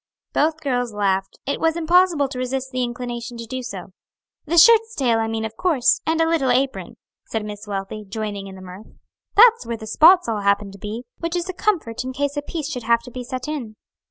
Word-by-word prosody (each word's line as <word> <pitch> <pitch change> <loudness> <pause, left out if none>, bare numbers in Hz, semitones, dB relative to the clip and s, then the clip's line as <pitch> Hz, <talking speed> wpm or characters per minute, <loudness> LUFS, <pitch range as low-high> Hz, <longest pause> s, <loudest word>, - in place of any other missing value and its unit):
Both 315 +2 +1
girls 245 -6 -1
laughed. 195 -1 0
It 280 - -2
was 325 0 +1
impossible 340 -3 +3
to 255 - -6
resist 260 +1 -3
the 255 - -2
inclination 240 0 -5
to 230 - -6
do 255 +3 -5
so. 195 -6 -8 0.5
"The 340 +3 0
shirt's 450 +5 +6
tail 240 -5 +2
I 225 - 0
mean, 225 0 -2
of 220 0 -6
course, 340 - +2
and 320 0 +1
a 325 - +3
little 320 -6 +1
apron," 265 +2 0 0.3
said 220 -2 -3
Miss 210 0 -8
Wealthy, 200 +1 -5
joining 205 -1 -4
in 190 - -10
the 190 - -11
mirth; 185 +3 -11 0.5
"that's 465 +1 +7
where 230 0 -4
the 220 - -9
spots 335 - +5
all 220 -3 -1
happen 200 0 +1
to 195 - -13
be, 215 +5 -6 0.2
which 335 +1 -3
is 350 +1 -2
a - - -2
comfort 335 - -1
in 260 0 -5
case 285 +2 -2
a 290 - -1
piece 305 0 -5
should 250 - -4
have 235 +1 +2
to 250 - -11
be 250 +1 -6
set 255 +1 -5
in." 260 -8 -5
250 Hz, 225 wpm, -22 LUFS, 220-315 Hz, 0.5 s, that's